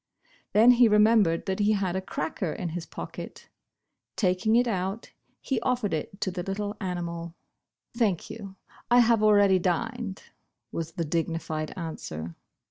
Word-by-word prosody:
Then 225 +4 +7
he 245 -1 +6
remem 215 +1 +6
bered 165 -2 -1
that 190 0 -2
he 210 +1 +3
had 190 -3 -1
a 190 - -1
cracker 160 -1 -3
in 175 - -4
his 170 +1 -5
pocket. - - -8 0.7
Taking 185 +3 +2
it 245 +1 +4
out 195 0 -3 0.3
he 260 -5 -2
offered 245 -6 0
it 160 +5 -4
to 190 - 0
the 180 0 -4
little 205 +3 -3
animal. 170 -2 -4 0.6
"Thank 210 -8 +1
you, 205 -3 -9 0.3
I 240 - +5
have 230 -2 +4
already 205 -3 +5
dined," 220 +3 -2 0.5
was 165 0 -4
the 170 -3 -2
dignified 160 -1 -2
answer. 85 - -6
190 Hz, 150 wpm, -27 LUFS, 170-220 Hz, 0.7 s, Then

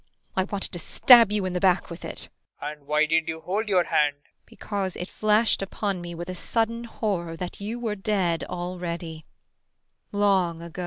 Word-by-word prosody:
I 190 - +2
wanted 200 0 -3
to 175 - -5
stab 230 +5 +7
you 210 -2 0
in 185 - -2
the 180 - 0
back 180 -2 +2
with 170 - -8
it. - - -4
PROFESSOR - - -35
RUBEK. - - -50
[Darkly.] 150 +1 -4
And 140 - -27
why 150 +1 +3
did 160 +1 +1
you 160 0 -4
hold 210 +5 -2
your 185 -3 +4
hand? 150 -3 +2
IRENE. 145 - -36
Because 195 -3 -4
it 180 - -5
flashed 215 +1 +2
upon 195 -1 -2
me 175 0 -6
with 170 +1 -6
a 185 - -4
sudden 230 +5 -1
horror 180 -8 -2
that 180 +2 -6
you 220 +4 -4
were 225 -3 -1
dead 195 -5 0
already 175 -2 -5 0.8
long 190 -5 +2
ago. 170 +2 -9
185 Hz, 205 wpm, -26 LUFS, 170-205 Hz, 0.8 s, stab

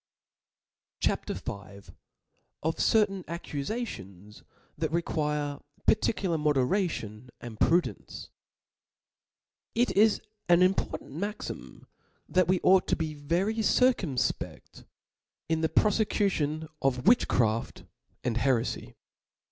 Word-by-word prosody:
CHAP. - - 0
V. - - -3 1.1
Of 160 +1 -1
certain 195 -4 +2
Accufations 140 - -6 0.3
that 160 0 -2
require 150 -3 -1 0.3
particular 180 -7 +2
Moderation 135 - 0
and 115 -3 -9
Prudence^ 175 +2 0 1.5
T 240 +2 +4
T - - -4
is 220 -1 +4 0.3
an 175 +1 +6
important 185 -6 0
maxima 205 +9 -6 0.5
that 185 -1 +2
we 185 0 +3
ought 185 -1 +5
to - - +2
'*• - - -12
be 160 -2 -2
very 170 +9 -1
circumfpeft 220 - 0 0.6
in 160 0 0
the 160 - +1
profecution 195 -8 +1
of 125 -2 0
witchcraft 115 - +2 0.4
and 120 -2 0
herefy. 120 - 0
160 Hz, 100 wpm, -28 LUFS, 135-195 Hz, 1.5 s, an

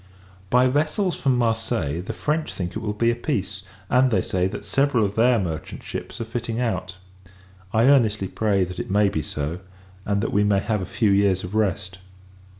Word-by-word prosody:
By 125 +1 +4
vessels 155 +8 0
from 130 -2 +1
Marseilles, 115 -8 -1
the - - -3
French 155 +1 -1
think 90 -1 -5
it - - -2
will 105 - -2
be 115 +2 +2
a - - -2
peace; 100 -7 -3 0.3
and 130 +3 +4
they 95 -6 +1
say, 90 0 0
that 100 +2 -7
several 135 -2 +2
of 100 - -2
their 120 +2 +4
merchant 80 -6 -4
ships - - -6
are - - -1
fitting 115 0 -4
out. 95 -6 -2 0.7
I 110 - +3
earnestly 110 -8 +3
pray, 100 -1 +1
that 90 0 -5
it - - -5
may 100 +1 +3
be 80 - -2
so; 75 +4 -4 0.4
and, 100 0 0
that - - -2
we 100 - +3
may 105 -1 +3
have 105 0 -1
a 90 - -5
few 105 0 +1
years 100 -2 +3
of 90 +2 -7
rest. 95 -3 -1
105 Hz, 200 wpm, -23 LUFS, 95-120 Hz, 0.7 s, By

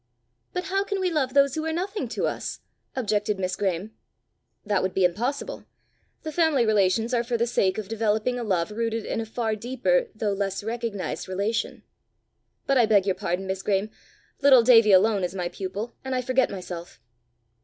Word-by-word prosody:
"But 360 - -3
how 390 +1 0
can 400 -1 -3
we 370 -1 0
love 275 -5 0
those 280 -1 +5
who 315 - -2
are 320 - -1
nothing 385 +5 -3
to - - -2
us?" - - -3 0.4
objected 210 -4 0
Miss 185 -1 -2
Graeme. 195 +1 -2 0.7
"That 205 -2 +1
would 185 0 -2
be 190 - +4
impossible. 250 - -2 0.6
The 315 - -4
family 310 -6 +3
relations 220 +2 +2
are 235 -1 +2
for 240 0 -1
the 235 - +2
sake 195 -6 +1
of 215 -3 -4
developing 220 +3 0
a - - -3
love 185 -4 0
rooted 230 0 -2
in - - -2
a 225 - -6
far 225 -1 -1
deeper 260 - 0
though 210 -2 -1
less 195 0 -2
recognized 225 -3 -4
relation. 200 +4 -2 0.8
But 275 -1 +3
I 235 - +5
beg 205 -3 +4
your 195 - +2
pardon, 180 +1 -3
Miss 190 0 -3
Graeme. 200 +1 0 0.5
Little 265 -4 +7
Davie 225 -3 +6
alone 200 +1 +4
is 180 +1 -2
my 175 -2 -2
pupil, 200 +6 -5
and 265 -1 -2
I 255 - -1
forget 255 +1 +2
myself." 180 -3 -7
220 Hz, 185 wpm, -25 LUFS, 195-255 Hz, 0.8 s, Little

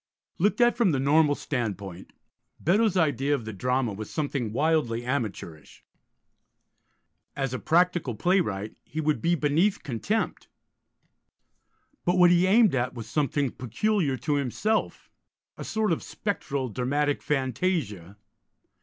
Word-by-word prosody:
Looked 205 +7 +2
at 240 0 +5
from 210 -9 +2
the 135 - +1
normal 145 +2 +3
standpoint, 100 - -4 0.5
Beddoes' 200 +3 +2
idea 145 -3 +2
of 120 -6 -6
the 110 - -6
drama 125 +2 0
was 105 +1 -7
something 140 -7 -2
wildly 130 -4 0
amateurish. 105 - -5 1.5
As 135 -2 -2
a 130 - -3
practical 170 -7 +1
playwright 110 - 0
he 155 - -6
would 150 -6 0
be 170 +1 +2
beneath 165 +7 +1
contempt; 165 - -2 1.6
but 175 +1 +1
what 175 -1 +6
he 175 +1 +4
aimed 215 -1 +5
at 125 -1 -1
was 115 -2 -7
something 145 0 0
peculiar 140 - -1
to 145 +3 -1
himself, 145 - -2 0.4
a - - -7
sort 220 -2 -1
of 165 - 0
spectral 140 - -3
dramatic 140 +5 -1
fantasia. 130 - -2
145 Hz, 130 wpm, -26 LUFS, 120-175 Hz, 1.6 s, what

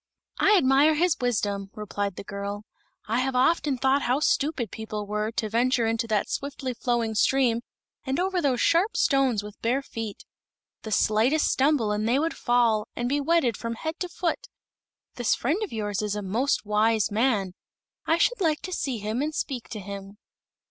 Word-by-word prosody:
"I 420 - +5
admire 280 +1 +4
his 340 +1 +2
wisdom," 205 -5 -1
replied 205 -2 -3
the - - -7
girl. 200 +1 -5 0.4
"I 225 +3 +1
have 260 0 -1
often 280 +1 +2
thought 265 +2 +2
how 255 +2 +1
stupid 285 - 0
people 215 -2 -5
were 210 +1 -2
to 220 - -1
venture 240 +2 +2
into 225 +1 0
that 215 -2 0
swiftly 275 -2 -4
flowing 235 -2 -1
stream 235 +1 +2 0.4
and 270 +2 -2
over 370 0 0
those 265 -5 +1
sharp 360 +7 +2
stones 265 -7 +2
with 210 0 -11
bare 255 +4 0
feet. 225 -5 -7 0.6
The 220 - -7
slightest 225 +9 +2
stumble 265 -6 +2
and 210 +2 0
they 250 - +3
would 320 +3 0
fall, 235 -3 +2
and 240 - -2
be 285 +3 0
wetted 280 -6 +2
from 230 0 -4
head 315 +7 -5
to 360 - -3
foot. 360 +9 -2 0.7
This 245 -2 +2
friend 310 - -1
of 425 - -3
yours 205 -3 -2
is 210 -1 -2
a 210 - -4
most 230 +7 0
wise 215 +1 +2
man. 210 -4 +1 0.5
I 325 - +3
should - - +1
like 315 -4 +1
to 370 - -5
see 270 -7 -2
him 215 +4 -2
and 305 +1 -2
speak 255 -5 -4
to 215 - -6
him." 200 +1 -8
240 Hz, 185 wpm, -26 LUFS, 215-280 Hz, 0.7 s, I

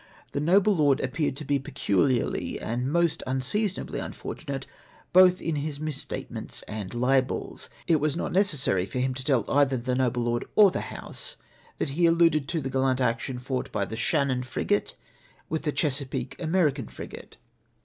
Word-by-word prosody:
The - - -2
noble 195 +7 +4
lord 145 -4 +3
appeared 135 +2 -1
to 150 - -6
be 140 0 +1
peculiarly 130 -3 0
and 125 +4 -2
most 170 -1 +2
unseason 175 - 0
ably - - -5
unfortunate - - -5 0.5
both 185 0 +7
in 165 -3 -2
his 145 0 -3
mis 155 -2 -2
statements - - -4
and 105 -3 -6
libels. 130 +2 0 0.2
It 165 - +4
was 150 +1 0
not - - -2
necessary 145 - +2
for - - -6
him 130 +1 +1
to 130 +1 -6
tell 130 -5 +2
either 140 -2 +3
the 125 +1 -2
noble 125 -1 +1
lord 120 +1 -1
or 205 -3 +7
the - - -2
House - - -7 0.4
that - - -1
he 170 +5 +3
alluded 165 -4 +4
to 165 -1 -1
the 135 -1 -4
gallant 130 -1 +1
action 125 +1 0
fought 130 +1 -3
by 100 -2 0
the 110 - -6
Shan'iioii 130 0 +1
frigate 105 -4 -1 0.5
with 160 0 -1
the 150 - +2
Chesapeake 135 -4 -2
American 155 - +1
frigate. - - -10
135 Hz, 170 wpm, -27 LUFS, 125-155 Hz, 0.5 s, both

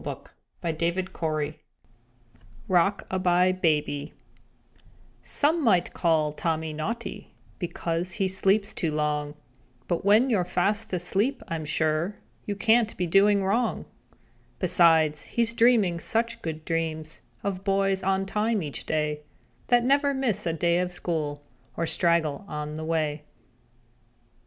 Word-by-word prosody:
_ 165 -2 -2 1.1
ROCK 185 +2 +2
A 190 - 0
BYE 180 0 +3
BABY 150 -5 -1 1.1
Some 310 +2 +1
might 185 -8 +2
call 155 -3 +1
Tommy 160 0 -2
naughty 195 +10 -5 0.2
Because 175 -1 -3
he 195 -1 0
sleeps 195 +2 +1
too 165 - -1
long, 150 -1 -1 0.5
But 170 - -1
when 215 +6 +4
you're 200 -6 +2
fast 205 +5 0
asleep, 195 +9 0
I'm 160 -2 -3
sure 155 +5 0 0.3
You 205 - -2
can't 225 +2 +2
be 180 - 0
doing 195 +3 +4
wrong. 225 +5 0 0.7
Besides 160 -4 +3
he's 230 -1 0
dreaming 225 -8 +3
such 230 +5 -1
good 160 -1 -5
dreams 160 -2 -3 0.2
Of 195 -1 -3
boys 195 -1 +1
on 195 0 0
time 210 0 0
each 145 -2 -5
day, 150 -1 -1 0.5
That 245 -1 +4
never 280 +1 +3
miss 255 -10 0
a 165 - 0
day 170 +1 +1
at 180 0 -1
school 155 -5 -3 0.3
Or 165 - 0
straggle 165 -2 +1
on 150 -2 -5
the 155 +1 -5
way. 155 -2 -1
175 Hz, 125 wpm, -26 LUFS, 155-205 Hz, 1.1 s, when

